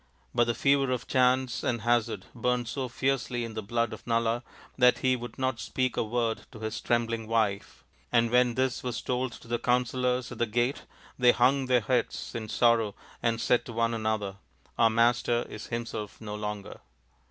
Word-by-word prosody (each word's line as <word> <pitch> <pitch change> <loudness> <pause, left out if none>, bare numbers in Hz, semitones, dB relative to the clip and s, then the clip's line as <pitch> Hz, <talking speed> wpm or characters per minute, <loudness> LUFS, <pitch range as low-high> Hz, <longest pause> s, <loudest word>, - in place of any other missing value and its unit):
But 120 -1 +4
the 120 0 0
fever 140 +2 +3
of 125 -1 -1
chance 130 -1 +2
and 120 -2 0
hazard 120 0 +1
burnt 125 0 0
so 130 +2 -3
fiercely 125 -1 -1
in 115 - -7
the 110 - -3
blood 115 +2 -1
of 110 - -10
Nala 115 0 +1 0.3
that 125 -1 +5
he 130 0 +4
would 120 -2 -8
not 130 -2 -1
speak 130 +2 -1
a - - +1
word 115 0 -1
to 110 - -11
his 110 0 -4
trembling 115 -1 0
wife; 110 -3 -1 0.3
and 115 0 +3
when 125 -1 +4
this 130 -1 0
was 125 -2 -3
told 125 0 -1
to - - -13
the 120 0 -1
counsellors 125 0 0
at - - -8
the 120 - +2
gate 120 +5 0 0.3
they 125 -1 +7
hung 130 +2 +3
their 125 -1 +4
heads 120 +1 -1
in 110 -2 -5
sorrow 115 -4 +3 0.3
and 115 -1 +1
said 120 - +2
to 120 - -7
one 115 +1 +1
another, 110 -3 -2 0.2
" - - -34
Our 115 -1 +6
master 120 +1 +2
is 105 - -8
himself 115 -3 -5
no 105 -2 -6
longer." 105 -1 -5
120 Hz, 190 wpm, -28 LUFS, 115-125 Hz, 0.3 s, they